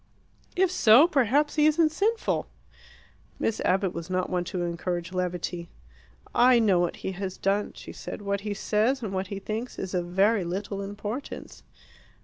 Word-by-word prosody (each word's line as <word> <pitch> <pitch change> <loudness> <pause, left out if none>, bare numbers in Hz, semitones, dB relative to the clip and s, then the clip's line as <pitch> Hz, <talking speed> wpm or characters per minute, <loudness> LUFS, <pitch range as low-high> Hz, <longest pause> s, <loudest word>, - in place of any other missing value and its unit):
"If 370 -1 +3
so, 260 -3 +7
perhaps 290 0 +2
he 300 0 +5
isn't 310 0 +3
sinful!" 435 +7 0 0.9
Miss 225 - -1
Abbott 190 0 +1
was 170 +1 -6
not 185 0 -1
one 180 -1 0
to 180 0 -3
encourage 175 0 -3
levity. 180 -1 -3 0.6
"I 250 0 +6
know 205 -6 +4
what 175 -1 0
he - - -1
has 190 0 -5
done," 200 +2 0
she - - -10
said. - - -7
"What 200 0 -1
he 205 0 -3
says 225 +6 +1
and 200 -3 -4
what 190 0 -2
he 200 0 -5
thinks 220 +5 -5
is 190 -1 -5
of 175 -1 -1
very 195 +3 +3
little 195 +3 -4
importance." 205 +6 -6
200 Hz, 165 wpm, -27 LUFS, 180-245 Hz, 0.9 s, so